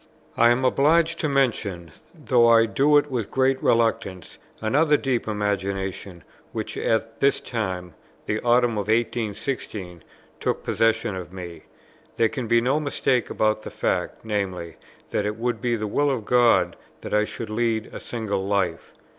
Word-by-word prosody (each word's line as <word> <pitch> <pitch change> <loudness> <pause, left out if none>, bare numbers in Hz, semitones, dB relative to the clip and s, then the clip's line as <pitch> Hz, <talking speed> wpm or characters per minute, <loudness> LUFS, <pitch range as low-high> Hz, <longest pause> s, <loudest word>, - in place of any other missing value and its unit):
I 115 +1 +5
am 125 +2 +2
obliged 160 +5 +3
to 155 - 0
mention, 105 - 0 0.2
though 125 -7 +3
I 115 -1 +6
do 145 +6 +3
it 145 0 +1
with 120 -5 -2
great 130 0 +1
reluctance, 115 -6 0 0.2
another 150 +7 +3
deep 130 -5 -1
imagination, 95 -3 -3 0.3
which - - -4
at 115 0 -1
this 140 0 +3
time, 95 -7 -4 0.3
the 105 - -1
autumn 120 0 +3
of 100 - -4
1816, 110 - -2 0.4
took - - -2
possession 115 -3 +1
of 90 -1 -7
me, 90 -3 -9 0.5
there 115 -1 +3
can 130 -5 -4
be 115 +1 +4
no 130 +5 +1
mistake 135 -4 0
about 110 0 +1
the - - -7
fact; - - -2
viz. 95 -6 -3 0.4
that 105 - 0
it 105 - -2
would 115 -1 -2
be 120 -1 +1
the 110 -1 -3
will 145 +8 +1
of 125 -6 -2
God 120 0 +3 0.2
that - - -6
I 105 0 +4
should 110 +1 -6
lead 110 0 -1
a - - -6
single 100 -5 -3
life. 100 -4 -1
115 Hz, 160 wpm, -24 LUFS, 100-125 Hz, 0.5 s, I